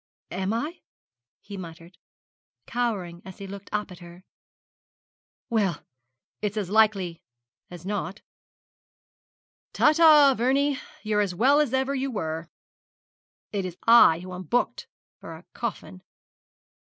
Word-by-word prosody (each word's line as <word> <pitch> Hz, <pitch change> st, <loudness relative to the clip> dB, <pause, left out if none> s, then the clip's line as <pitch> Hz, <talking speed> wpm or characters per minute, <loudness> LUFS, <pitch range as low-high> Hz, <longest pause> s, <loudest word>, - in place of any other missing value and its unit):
'Am 190 Hz, +2 st, -2 dB
I?' 295 Hz, +10 st, -3 dB, 0.6 s
he 200 Hz, -, -9 dB
muttered, 170 Hz, 0 st, -11 dB, 0.7 s
cowering 195 Hz, -8 st, -3 dB
as 190 Hz, -1 st, -11 dB
he 200 Hz, -, -8 dB
looked 200 Hz, 0 st, -9 dB
up 210 Hz, -2 st, -2 dB
at 180 Hz, -, -11 dB
her. 175 Hz, +1 st, -14 dB, 1.2 s
'Well, 205 Hz, -, 0 dB, 0.6 s
it's 210 Hz, 0 st, -2 dB
as 200 Hz, -3 st, -3 dB
likely 205 Hz, -6 st, +2 dB, 0.5 s
as 175 Hz, -1 st, -11 dB
not. 200 Hz, -1 st, -4 dB, 1.5 s
Ta, -, -, +5 dB
ta, 305 Hz, -4 st, +7 dB
Vernie! 270 Hz, +3 st, +1 dB, 0.2 s
You're 210 Hz, -1 st, +1 dB
as 190 Hz, -3 st, -2 dB
well 270 Hz, +9 st, +4 dB
as 295 Hz, -5 st, +1 dB
ever 265 Hz, +1 st, 0 dB
you 270 Hz, 0 st, -2 dB
were. 165 Hz, -7 st, -4 dB, 1.0 s
It 200 Hz, -2 st, -2 dB
is 180 Hz, -1 st, -6 dB
I 230 Hz, -8 st, +7 dB
who 185 Hz, 0 st, -8 dB
am 180 Hz, -, -6 dB
booked 175 Hz, -, -1 dB, 0.3 s
for -, -, -9 dB
a -, -, -15 dB
coffin!' 90 Hz, 0 st, -6 dB
200 Hz, 125 wpm, -26 LUFS, 180-240 Hz, 1.5 s, ta